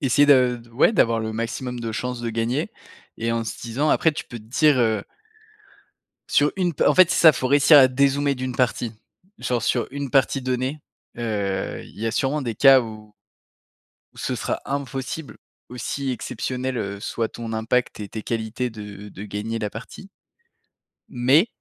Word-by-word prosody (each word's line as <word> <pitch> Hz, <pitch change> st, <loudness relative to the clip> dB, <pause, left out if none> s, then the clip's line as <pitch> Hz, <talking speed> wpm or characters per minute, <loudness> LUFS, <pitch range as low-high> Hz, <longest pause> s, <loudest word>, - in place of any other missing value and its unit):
Essayer 145 Hz, +1 st, +4 dB
de 130 Hz, -3 st, +5 dB
d 120 Hz, 0 st, -15 dB
ouais, 125 Hz, -, +3 dB
d'avoir 115 Hz, -, +2 dB
le 110 Hz, 0 st, -3 dB
maximum 120 Hz, +2 st, -4 dB
de 115 Hz, -1 st, -4 dB
chances 125 Hz, +2 st, -4 dB
de 120 Hz, -, -3 dB
gagner 120 Hz, -, -2 dB, 0.5 s
et 115 Hz, 0 st, -1 dB
en 115 Hz, 0 st, -1 dB
se 110 Hz, -, -6 dB
disant, 120 Hz, +6 st, -1 dB
après, 160 Hz, -, +3 dB
tu 150 Hz, -, -6 dB
peux 120 Hz, -, -9 dB
te -, -, -14 dB
dire, 140 Hz, +5 st, +3 dB
heu 110 Hz, -3 st, +1 dB, 1.2 s
sur 145 Hz, +1 st, +3 dB
une 180 Hz, -3 st, 0 dB
p -, -, 0 dB
en -, -, +5 dB
fait, 185 Hz, -2 st, +6 dB
c'est -, -, +1 dB
ça, 160 Hz, -2 st, +8 dB
faut 130 Hz, -1 st, -2 dB
réussir 145 Hz, +2 st, +7 dB
à 130 Hz, -2 st, +7 dB
dézoomer 140 Hz, +2 st, +2 dB
d'une 130 Hz, -1 st, -4 dB
partie. 120 Hz, -2 st, 0 dB, 0.5 s
Genre, 120 Hz, -3 st, -1 dB
sur 120 Hz, -1 st, +1 dB
une 140 Hz, 0 st, -5 dB
partie 135 Hz, +1 st, +2 dB
donnée, 130 Hz, +3 st, -2 dB, 0.4 s
heu, 100 Hz, -5 st, -2 dB
il -, -, -16 dB
y 115 Hz, -, -2 dB
a -, -, +1 dB
sûrement 140 Hz, +5 st, 0 dB
des 120 Hz, -3 st, -3 dB
cas 135 Hz, +3 st, +7 dB
où 110 Hz, -2 st, -9 dB, 1.0 s
où -, -, -17 dB
ce -, -, -2 dB
sera -, -, -3 dB
impossible. 140 Hz, +2 st, -5 dB, 0.3 s
Aussi, 135 Hz, +2 st, -3 dB
exceptionnels, 125 Hz, +1 st, -3 dB
heu, 100 Hz, -3 st, -4 dB
soient 115 Hz, +1 st, -2 dB
ton 115 Hz, -1 st, -6 dB
impact 115 Hz, +3 st, 0 dB
et 105 Hz, -, -6 dB
tes 110 Hz, -, -6 dB
qualités 115 Hz, +2 st, -3 dB
de 105 Hz, -2 st, -9 dB
de 100 Hz, -, -10 dB
gagner 105 Hz, +2 st, -4 dB
la 105 Hz, -2 st, -3 dB
partie. 125 Hz, -, -10 dB, 1.0 s
Mais 135 Hz, -, +3 dB
125 Hz, 185 wpm, -23 LUFS, 115-135 Hz, 1.2 s, ça